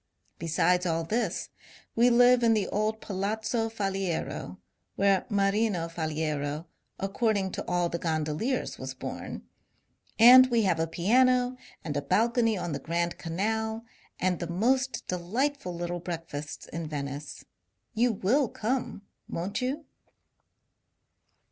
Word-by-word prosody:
Besides 180 +2 +2
all 165 0 0
this, 215 +1 -1 0.5
we 240 +2 +5
live 245 +1 +6
in 230 -1 +4
the 205 -3 0
old 215 +1 -1
Palazzo 220 +4 -2
Faliero 195 -5 -3 0.4
(where 195 -1 +2
Marino 200 -3 +1
Faliero, 155 -2 -2 0.3
according 195 -1 0
to - - -5
all 175 -1 +1
the 170 0 -3
gondoliers, 160 - -1
was - - -6
bom) - - -6 0.7
and 255 +3 +9
we 235 -2 +2
have 180 -4 +2
a 165 - +1
piano 250 +9 +3 0.3
and 150 -3 -4
a 145 - 0
balcony 225 - +2
on 175 -2 -3
the 140 - -3
Grand 170 +4 -2
Canal, 220 +6 -2 0.3
and 180 -1 +1
the 170 - -4
most 255 +9 +1
delightful 185 +4 -2
little 175 +1 -3
breakfasts 165 -4 -6
in 165 -1 -5
Venice. 145 -1 -6 0.5
You 240 +2 +3
will 225 +6 +1
come, 235 -2 -3 0.3
won't 190 +8 -3
you 275 +5 -2
195 Hz, 125 wpm, -28 LUFS, 170-230 Hz, 0.7 s, and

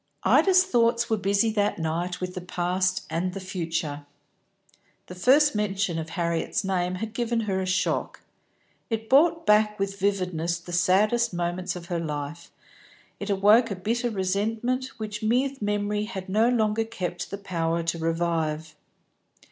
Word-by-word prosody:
Ida's 370 -1 +5
thoughts 235 -8 +1
were 220 - +3
busy 200 +3 +2
that 205 -1 0
night 170 +2 -2
with 180 0 -4
the 180 - -5
past 180 +1 -1
and 180 +3 -2
the - - -3
future. 165 -6 -4 1.0
The - - -9
first 275 +11 +4
mention 195 -5 -1
of 160 0 -5
Harriet's 170 +1 -1
name 185 -1 -1
had 220 +4 -5
given 235 0 0
her 195 -3 -1
a 185 - -3
shock; 185 0 -1 0.7
it 225 -1 -3
brought 325 +4 +4
back 210 0 +4
with 195 0 -3
vividness 180 -4 0
the 175 +1 -10
saddest 205 +5 +2
moments 175 +1 -2
of 175 -1 -8
her 175 -1 -2
life; 150 0 -5 0.7
it 200 - -5
awoke 210 +4 +5
a 200 - -3
bitter 235 +6 -1
resentment 220 +6 -1
which 210 -1 -5
mere 250 +5 +2
memory 205 0 -1
had 190 -3 -6
no 215 +5 +3
longer 225 -2 +1
kept 180 -6 -5
the 200 - -5
power 170 -4 -2
to 170 0 -2
revive. 165 -1 -1
195 Hz, 155 wpm, -26 LUFS, 175-220 Hz, 1.0 s, Ida's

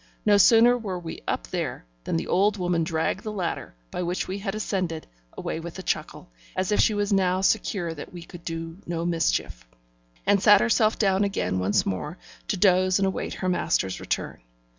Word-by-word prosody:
No 205 -1 +6
sooner 230 +4 +7
were 205 -6 -4
we 170 -2 -7
up - - -1
there, - - -3 0.2
than - - 0
the - - -2
old 205 +3 +2
woman 175 -2 0
dragged 160 +3 -1
the 215 - -4
ladder, 185 - -4 0.2
by - - -3
which 175 +1 -2
we 190 +2 -4
had 195 0 -3
ascended, 185 -6 -2 0.3
away - - -3
with 170 +2 -8
a 190 - -7
chuckle, - - -3 0.2
as 185 +2 -1
if 210 - +2
she 215 - +4
was 205 0 0
now 185 -1 +2
secure 180 -3 +1
that 145 - -9
we 175 -2 -9
could 175 0 -12
do 165 +1 -5
no 170 -1 -2
mischief, 165 - 0 0.6
and 200 -1 +3
sat 205 -1 +7
herself 220 -1 +3
down 195 -1 +2
again 195 - -1
once 95 +3 +2
more, 150 - -3 0.3
to 205 - -1
doze 185 -1 +4
and 195 - +2
await 190 - -2
her 185 - -3
master's 165 - 0
return. - - -3
185 Hz, 195 wpm, -25 LUFS, 165-200 Hz, 0.6 s, sooner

